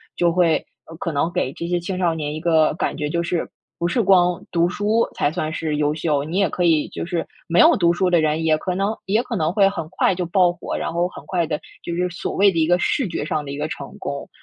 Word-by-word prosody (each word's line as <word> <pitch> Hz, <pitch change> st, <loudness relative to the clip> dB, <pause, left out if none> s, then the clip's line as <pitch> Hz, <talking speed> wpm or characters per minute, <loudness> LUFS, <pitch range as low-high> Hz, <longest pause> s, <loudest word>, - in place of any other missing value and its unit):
就 170 Hz, -1 st, +2 dB
会， 170 Hz, -3 st, +3 dB, 0.3 s
呃， 165 Hz, -, -11 dB
可 165 Hz, -, -3 dB
能 150 Hz, +3 st, 0 dB
给 130 Hz, -, 0 dB
这 170 Hz, -, -5 dB
些 175 Hz, 0 st, +1 dB
青 180 Hz, +2 st, -4 dB
少 175 Hz, -3 st, +1 dB
年 150 Hz, -2 st, -3 dB
一 155 Hz, -, -4 dB
个 160 Hz, -2 st, +3 dB
感 -, -, -2 dB
觉， 150 Hz, -1 st, -3 dB
就 170 Hz, +2 st, 0 dB
是 170 Hz, 0 st, -2 dB, 0.3 s
不 170 Hz, -, -1 dB
是 235 Hz, +6 st, +1 dB
光 180 Hz, -3 st, +3 dB
读 170 Hz, 0 st, +2 dB
书 210 Hz, +5 st, +1 dB
才 -, -, +1 dB
算 155 Hz, -2 st, -3 dB
是 155 Hz, -3 st, -2 dB
优 150 Hz, 0 st, +1 dB
秀， 150 Hz, -3 st, 0 dB
你 165 Hz, +5 st, -3 dB
也 195 Hz, -5 st, +3 dB
可 180 Hz, -, -2 dB
以 160 Hz, -3 st, +3 dB
就 -, -, -5 dB
是 170 Hz, -1 st, -3 dB, 0.2 s
没 170 Hz, +1 st, +2 dB
有 -, -, +7 dB
读 170 Hz, -2 st, +4 dB
书 185 Hz, +1 st, +1 dB
的 170 Hz, -2 st, +3 dB
人， 155 Hz, +1 st, 0 dB
也 155 Hz, -1 st, +3 dB
可 180 Hz, +3 st, -3 dB
能 200 Hz, +3 st, 0 dB
也 215 Hz, +4 st, +2 dB
可 235 Hz, -, -4 dB
能 160 Hz, -4 st, 0 dB
会 195 Hz, -1 st, +5 dB
很 165 Hz, -6 st, -5 dB
快 185 Hz, 0 st, +1 dB
就 180 Hz, -, -2 dB
爆 180 Hz, -1 st, +3 dB
火， 175 Hz, -, -5 dB
然 -, -, -3 dB
后 175 Hz, +1 st, +1 dB
很 -, -, -12 dB
快 175 Hz, -3 st, 0 dB
地， 150 Hz, -1 st, -2 dB, 0.2 s
就 170 Hz, -, -4 dB
是 180 Hz, +1 st, 0 dB
所 175 Hz, -, -5 dB
谓 200 Hz, +1 st, +5 dB
的 165 Hz, -, -5 dB
一 160 Hz, -, +3 dB
个 175 Hz, 0 st, +3 dB
视 260 Hz, +6 st, 0 dB
觉 -, -, -3 dB
上 155 Hz, -1 st, -2 dB
的 140 Hz, -, -6 dB
一 140 Hz, -, -5 dB
个 150 Hz, +1 st, -2 dB
成 140 Hz, -2 st, -8 dB
功， 140 Hz, 0 st, -5 dB
170 Hz, 295 characters per minute, -21 LUFS, 155-180 Hz, 0.3 s, 有